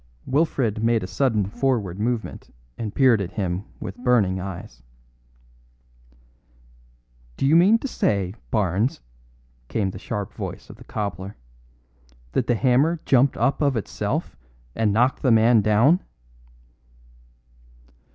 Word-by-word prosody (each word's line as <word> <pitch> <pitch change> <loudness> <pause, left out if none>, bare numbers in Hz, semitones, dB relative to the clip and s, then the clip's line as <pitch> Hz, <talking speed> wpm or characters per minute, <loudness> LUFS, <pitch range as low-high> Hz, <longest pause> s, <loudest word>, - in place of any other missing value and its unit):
Wilfred 130 -7 0
made 115 -2 +2
a - - -3
sudden 105 +2 0
forward 105 -4 -1
movement 115 +1 -3 0.3
and 110 -3 -5
peered 125 -6 +4
at 95 0 -5
him 95 -1 -2
with 95 - -7
burning 105 -7 +2
eyes. 90 -10 -8 2.6
"Do - - -1
you 145 +4 +4
mean 190 +7 +6
to 275 - -5
say, 100 - -1 0.2
Barnes," 105 +4 0 0.7
came 100 - -1
the 95 - -9
sharp 105 -2 -5
voice - - -7
of - - -14
the - - -14
cobbler, 100 -1 -5 0.9
"that 120 - -1
the 120 - +2
hammer 135 +8 +2
jumped 135 +1 +3
up 140 - +1
of 140 -4 +2
itself 110 - -3 0.4
and 110 -2 +1
knocked 125 +5 +2
the 130 - +2
man 115 0 +5
down?" 110 - +4
110 Hz, 125 wpm, -23 LUFS, 100-130 Hz, 2.6 s, mean